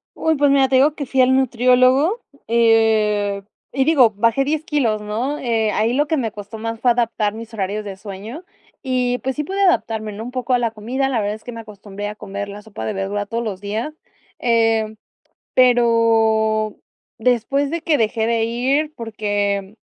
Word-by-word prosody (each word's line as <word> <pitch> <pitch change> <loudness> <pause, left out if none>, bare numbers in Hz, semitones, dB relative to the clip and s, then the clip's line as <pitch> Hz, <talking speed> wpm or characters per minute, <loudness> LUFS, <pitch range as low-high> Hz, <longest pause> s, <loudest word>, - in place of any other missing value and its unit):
Uy, 320 0 +1
pues 285 0 +3
mira, 275 -1 +4
te 265 - +1
digo 280 +4 +4
que 285 -3 -6
fui 265 +1 +2
al 255 +1 +4
nutriólogo, 255 - +3 0.3
eh, 220 -3 +2 0.3
y 270 - +1
digo, 265 -6 +5
bajé 230 +5 +1
10 305 +2 -1
kilos, 260 - 0
¿no? 235 +8 -3
Eh, 225 -3 0
ahí 220 +3 +1
lo 290 +3 +2
que 315 - 0
me 230 -5 -1
costó 210 +2 -9
más, 225 0 -4
fue 245 +1 +3
adaptar 230 -3 0
mis 225 +1 -9
horarios 210 0 -3
de 200 -2 -7
sueño. 210 - -8 0.4
Y, 250 -2 0
pues, 265 +3 -3
sí 300 - -2
pude 385 +6 -4
adaptarme, 225 - +1
¿no?, 210 +2 -7
un 240 - -6
poco 255 0 -2
a 245 - +3
la 235 -1 +1
comida. 240 +5 -2
La 250 -4 0
verdad, 205 0 -1
es 215 - -10
que 245 - -7
me 230 - -7
acostumbré 205 -1 -8
a - - -6
comer 200 -1 -6
la 205 +1 -8
sopa 205 - -8
de - - -2
verdura, 195 +1 -3
todos 230 +3 -3
los 205 -5 -4
días. 215 +8 -3 0.5
Eh, 225 -2 +1 0.6
pero 225 -3 +3 0.4
después 250 +4 +1
de 335 0 -2
que 320 -2 +2
dejé 220 0 0
de 230 -1 +1
ir, 265 +7 0
porque 205 -3 -2
230 Hz, 195 wpm, -20 LUFS, 215-260 Hz, 0.6 s, digo